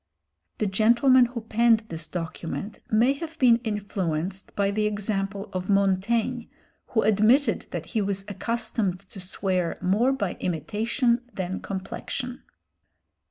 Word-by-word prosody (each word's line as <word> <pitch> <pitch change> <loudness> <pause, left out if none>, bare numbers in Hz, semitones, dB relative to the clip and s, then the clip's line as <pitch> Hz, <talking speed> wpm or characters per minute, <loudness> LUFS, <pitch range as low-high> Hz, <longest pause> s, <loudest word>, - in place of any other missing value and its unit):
The 215 - 0
gentleman 235 +6 +5
who 240 -1 -6
penned 225 0 +3
this 165 -1 -5
document 175 +4 -5
may 235 +5 +4
have 325 +2 -7
been 245 -4 +6
influenced 195 -5 -3
by 200 -1 +1
the 210 +1 +1
example 200 -1 -2
of 185 +1 -3
Montaigne 205 +5 +1 0.4
who 220 - +1
admitted 220 +7 +3
that - - -4
he 220 - -1
was 195 -1 -1
accustomed 210 -2 -1
to 195 0 -13
swear 185 -1 -1
"more 215 +8 +2
by 205 -9 -2
imitation 225 - 0
than 190 -1 -3
complexion." 235 +5 -5
210 Hz, 125 wpm, -26 LUFS, 190-235 Hz, 0.4 s, been